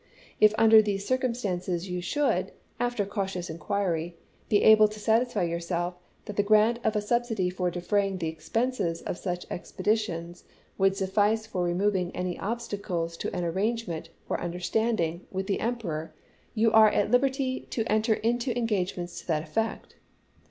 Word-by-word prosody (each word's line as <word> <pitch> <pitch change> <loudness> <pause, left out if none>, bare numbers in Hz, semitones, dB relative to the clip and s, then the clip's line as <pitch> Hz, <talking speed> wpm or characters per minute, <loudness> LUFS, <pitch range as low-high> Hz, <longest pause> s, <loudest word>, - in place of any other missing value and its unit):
If 215 0 +6
under 220 -1 +8
these 200 -2 -2
circumstances 195 -9 -1
you 180 -1 -3
should, 290 +11 0 0.3
after 240 -4 0
cautious 190 -4 -3
inquiry, 170 0 -2 0.3
be 205 - +3
able 215 0 +8
to 215 0 -9
satisfy 225 +1 +2
yourself 170 +1 -2 0.3
that 210 - -7
the - - +5
grant 215 +3 +4
of 220 0 +1
a 210 - +2
subsidy 225 -4 0
for 180 -1 -1
defraying 195 +2 0
the 165 -3 -2
expenses 175 +1 -2
of 175 - -4
such 180 -2 -3
expeditions 180 -3 -2 0.3
would 195 0 +2
suffice 205 +3 +1
for 185 -5 -2
removing 180 +1 +1
any 180 0 -3
obstacles 200 -7 -3
to - - -4
an 180 - -1
arrangement, 185 -2 -2 0.2
or - - -2
un 175 -1 -3
derstanding, 180 -2 0
with 190 0 -3
the 195 - -1
Emperor, 165 -10 -3 0.4
you 225 0 +3
are 220 -1 +7
at 205 0 0
hberty 260 +1 +1
to 225 - -1
enter 220 +1 +2
into 240 +3 -1
engagements 185 -6 -2
to - - -22
that 155 -3 0
effect. 225 +5 -3
200 Hz, 155 wpm, -27 LUFS, 175-225 Hz, 0.4 s, under